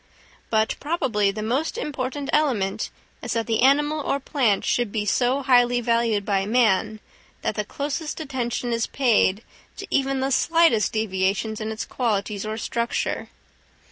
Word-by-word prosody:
But 220 Hz, 0 st, +2 dB
probably 245 Hz, -10 st, 0 dB
the 210 Hz, +2 st, -4 dB
most 270 Hz, -, -1 dB
important 280 Hz, -, -3 dB
element 240 Hz, -11 st, +1 dB, 0.3 s
is -, -, -3 dB
that 230 Hz, -1 st, -1 dB
the 225 Hz, -1 st, 0 dB
animal 295 Hz, +4 st, +3 dB
or 280 Hz, -1 st, -1 dB
plant 250 Hz, -7 st, +1 dB
should 240 Hz, -4 st, 0 dB
be 210 Hz, -1 st, -2 dB
so 250 Hz, +6 st, +1 dB
highly 245 Hz, -1 st, +4 dB
valued 230 Hz, -3 st, +1 dB
by 195 Hz, -2 st, +1 dB
man, 220 Hz, -2 st, +2 dB, 0.4 s
that -, -, 0 dB
the 210 Hz, -, -2 dB
closest 290 Hz, +8 st, -4 dB
attention 250 Hz, -4 st, -3 dB
is 230 Hz, 0 st, 0 dB
paid 225 Hz, -5 st, +2 dB, 0.3 s
to -, -, -6 dB
even 270 Hz, -1 st, +1 dB
the 265 Hz, +1 st, -1 dB
slightest 325 Hz, -, +3 dB
deviations 215 Hz, +1 st, -1 dB
in 215 Hz, 0 st, -3 dB
its 220 Hz, -, -4 dB
qualities 210 Hz, -3 st, -2 dB
or 215 Hz, 0 st, -3 dB
structure. 235 Hz, +1 st, -2 dB
235 Hz, 150 wpm, -24 LUFS, 215-270 Hz, 0.4 s, highly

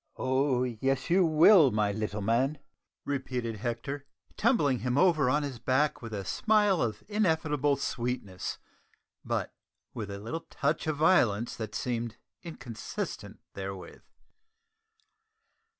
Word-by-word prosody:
"Oh, 130 Hz, -1 st, +1 dB
yes, 130 Hz, +4 st, -1 dB
you 185 Hz, +1 st, +5 dB
will, 160 Hz, 0 st, +7 dB
my 105 Hz, -2 st, +1 dB
little 105 Hz, 0 st, -3 dB
man!" 125 Hz, +7 st, +1 dB, 0.5 s
repeated 125 Hz, -5 st, -3 dB
Hector, 125 Hz, +6 st, -4 dB, 0.3 s
tumbling 150 Hz, -, +2 dB
him 125 Hz, +4 st, -1 dB
over 155 Hz, -6 st, +4 dB
on 145 Hz, +3 st, +2 dB
his 135 Hz, -4 st, -5 dB
back 130 Hz, +5 st, +1 dB
with 115 Hz, -2 st, -7 dB
a 100 Hz, -2 st, -4 dB
smile 210 Hz, -, +2 dB
of 115 Hz, -3 st, -2 dB
ineffable 160 Hz, -8 st, +1 dB
sweetness, 120 Hz, -8 st, -3 dB, 0.7 s
but -, -, -2 dB, 0.4 s
with 105 Hz, -3 st, -5 dB
a 100 Hz, -, -5 dB
little 115 Hz, +11 st, -6 dB
touch -, -, -1 dB
of 155 Hz, -2 st, 0 dB
violence 120 Hz, -, +3 dB
that 110 Hz, -2 st, -5 dB
seemed 120 Hz, -2 st, -3 dB, 0.2 s
inconsistent 125 Hz, -, -6 dB
therewith. 95 Hz, -1 st, -7 dB
130 Hz, 120 wpm, -29 LUFS, 115-150 Hz, 0.7 s, will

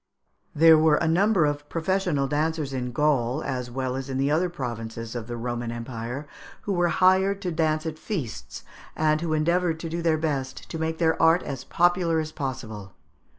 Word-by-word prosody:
There 160 Hz, +1 st, +7 dB
were 155 Hz, -1 st, +5 dB
a 160 Hz, -, 0 dB
number 185 Hz, +1 st, +3 dB
of 145 Hz, 0 st, -2 dB
professional 165 Hz, -4 st, 0 dB
dancers 150 Hz, -1 st, -1 dB
in 125 Hz, -1 st, -3 dB
Gaul, 135 Hz, 0 st, +1 dB
as 125 Hz, -2 st, -3 dB
well 130 Hz, +1 st, -3 dB
as 135 Hz, +1 st, -5 dB
in 130 Hz, -, -2 dB
the 135 Hz, +2 st, +1 dB
other 175 Hz, +4 st, +2 dB
provinces 115 Hz, -6 st, -5 dB
of 120 Hz, -2 st, -5 dB
the 120 Hz, -1 st, -5 dB
Roman 120 Hz, 0 st, -3 dB
Empire, 120 Hz, +3 st, -5 dB, 0.4 s
who 200 Hz, -, -1 dB
were 175 Hz, -1 st, +2 dB
hired 190 Hz, +3 st, +3 dB
to 180 Hz, -, -1 dB
dance 155 Hz, -1 st, 0 dB
at 155 Hz, -1 st, -4 dB
feasts, 110 Hz, -, -5 dB, 0.3 s
and 155 Hz, 0 st, +2 dB
who 165 Hz, -2 st, -1 dB
endeavoured 165 Hz, +1 st, +1 dB
to 165 Hz, -, -4 dB
do 170 Hz, +1 st, -3 dB
their 165 Hz, -2 st, +2 dB
best 140 Hz, -4 st, -3 dB
to 165 Hz, -, -4 dB
make 160 Hz, 0 st, -2 dB
their 160 Hz, -1 st, +1 dB
art 165 Hz, +2 st, +5 dB
as 135 Hz, -2 st, -5 dB
popular 175 Hz, 0 st, +2 dB
as 155 Hz, 0 st, -3 dB
possible. 110 Hz, -9 st, -6 dB
155 Hz, 190 wpm, -25 LUFS, 130-165 Hz, 0.4 s, There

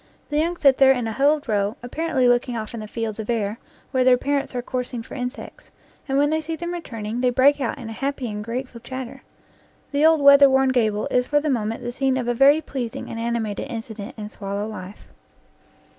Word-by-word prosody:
The 295 Hz, -, +1 dB
young 340 Hz, +3 st, 0 dB
sit 275 Hz, -4 st, +4 dB
there 270 Hz, -1 st, +7 dB
in 250 Hz, -3 st, 0 dB
a 225 Hz, -, -2 dB
huddled 285 Hz, +5 st, +2 dB
row, 205 Hz, 0 st, 0 dB
apparently 265 Hz, 0 st, 0 dB
looking 245 Hz, 0 st, +2 dB
off 215 Hz, 0 st, -5 dB
in 230 Hz, -, -5 dB
the 215 Hz, -, -7 dB
fields 225 Hz, -1 st, -4 dB
of 220 Hz, -, -6 dB
air 220 Hz, -1 st, -1 dB, 0.3 s
where 260 Hz, -1 st, +2 dB
their 250 Hz, 0 st, +5 dB
parents 280 Hz, 0 st, -2 dB
are 245 Hz, -, -1 dB
coursing 250 Hz, -2 st, -4 dB
for -, -, -12 dB
insects, 250 Hz, 0 st, -7 dB, 0.4 s
and 270 Hz, -1 st, 0 dB
when 290 Hz, +1 st, +3 dB
they 315 Hz, 0 st, +1 dB
see 320 Hz, +1 st, -4 dB
them 345 Hz, +2 st, -5 dB
returning, 230 Hz, -8 st, -5 dB
they 250 Hz, -, +3 dB
break 275 Hz, +4 st, +4 dB
out 245 Hz, -, -2 dB
in 245 Hz, -5 st, -8 dB
a -, -, -6 dB
happy 275 Hz, +1 st, -3 dB
and 210 Hz, -1 st, -5 dB
grateful 235 Hz, +1 st, -5 dB
chatter. 260 Hz, 0 st, -7 dB, 0.7 s
The 285 Hz, +1 st, +1 dB
old 320 Hz, -1 st, +5 dB
weather 280 Hz, 0 st, +8 dB
worn 265 Hz, 0 st, +3 dB
gable 220 Hz, -5 st, +1 dB
is 250 Hz, 0 st, +2 dB
for 295 Hz, -, +3 dB
the 300 Hz, 0 st, -1 dB
moment 230 Hz, -1 st, -2 dB
the 240 Hz, -, -3 dB
scene 265 Hz, +1 st, 0 dB
of 245 Hz, -2 st, -2 dB
a 240 Hz, -, +1 dB
very 280 Hz, +5 st, +5 dB
pleasing 255 Hz, -6 st, -5 dB
and 230 Hz, -, -5 dB
ani 235 Hz, +1 st, -1 dB
mated 210 Hz, -2 st, -4 dB
incident 220 Hz, -3 st, -7 dB
in 210 Hz, -1 st, -6 dB
swallow 200 Hz, 0 st, -4 dB
life. 200 Hz, -2 st, -9 dB
250 Hz, 225 wpm, -23 LUFS, 225-280 Hz, 0.7 s, weather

